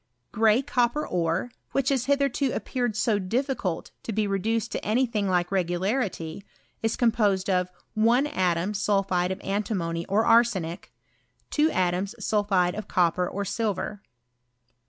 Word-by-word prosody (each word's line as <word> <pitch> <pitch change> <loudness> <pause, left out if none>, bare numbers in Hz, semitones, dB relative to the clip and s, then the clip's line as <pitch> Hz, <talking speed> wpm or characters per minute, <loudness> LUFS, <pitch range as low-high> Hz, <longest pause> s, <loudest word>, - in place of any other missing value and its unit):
| - - -49
Gray 220 +3 +3
copper 255 +1 +1
ore, 170 +6 -1 0.2
which 275 -1 +1
has 265 -3 +1
hitherto 280 -1 +1
appeared 245 -5 -2
so 215 -1 +1
difficult 215 - -2
to - - -5
be 215 0 0
reduced 220 +3 -1
to - - -4
any 235 +5 +2
thing 210 -5 -1
like 180 0 +1
regularity, 185 -1 -1 0.2
' - - -40
in 225 - +1
composed 215 -5 +1
of 180 -1 +1 0.2
' - - -46
1 235 +5 +3
atom 185 - 0
sulphide 195 -3 +1
of 190 - -4
antimony 190 -5 -2
or 210 +3 +2
arsenic 200 -7 +2 0.6
2 305 +1 +3
atoms 185 - 0
sulphide 200 -4 +1
of 215 - -6
copper 180 -1 +1
or 200 +1 -3
silver. 205 -1 -2
205 Hz, 150 wpm, -26 LUFS, 185-235 Hz, 0.6 s, Gray